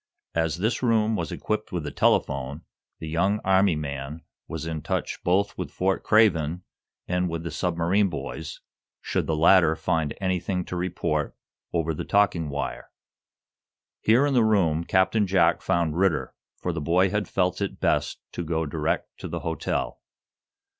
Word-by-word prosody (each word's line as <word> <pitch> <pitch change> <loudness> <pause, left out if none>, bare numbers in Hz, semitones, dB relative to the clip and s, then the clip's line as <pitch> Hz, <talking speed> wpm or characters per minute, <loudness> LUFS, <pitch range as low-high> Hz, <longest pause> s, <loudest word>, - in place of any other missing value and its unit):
As 80 0 0
this 110 +6 0
room 110 -3 +2
was - - -3
equipped 110 0 -3
with 85 -4 -3
a - - -4
telephone, 70 +4 +1 0.3
the 80 - -7
young 95 +6 +1
Army 95 -2 +4
man 75 +1 -5 0.2
was - - -5
in 80 -2 -3
touch - - -3
both 100 +3 +1
with - - -3
Fort 95 +1 0
Craven 90 -6 +3 0.4
and 90 0 0
with 85 0 -4
the 85 - -4
submarine 90 +4 +1
boys, 70 -6 -6 0.4
should - - -2
the 80 - +1
latter 80 0 +5
find 80 -3 -1
anything 95 -1 -1
to - - -5
report 85 -4 -1 0.4
over 80 -1 0
the - - -4
talking 90 -6 +2
wire. 70 0 -4 1.1
Here 120 +6 +4
in 145 - +1
the 120 -3 +4
room 85 -7 +2
Captain 95 +4 +2
Jack 95 +1 +3
found 85 -4 0
Ridder, 90 -3 +1 0.2
for 90 - -3
the 80 - -3
boy 90 +5 +3
had 105 0 -1
felt 90 0 0
it 100 - -3
best - - +1
to 85 - -4
go 80 0 -1
direct 70 - -2
to - - -5
the - - -4
hotel. - - -2
90 Hz, 160 wpm, -25 LUFS, 80-95 Hz, 1.1 s, latter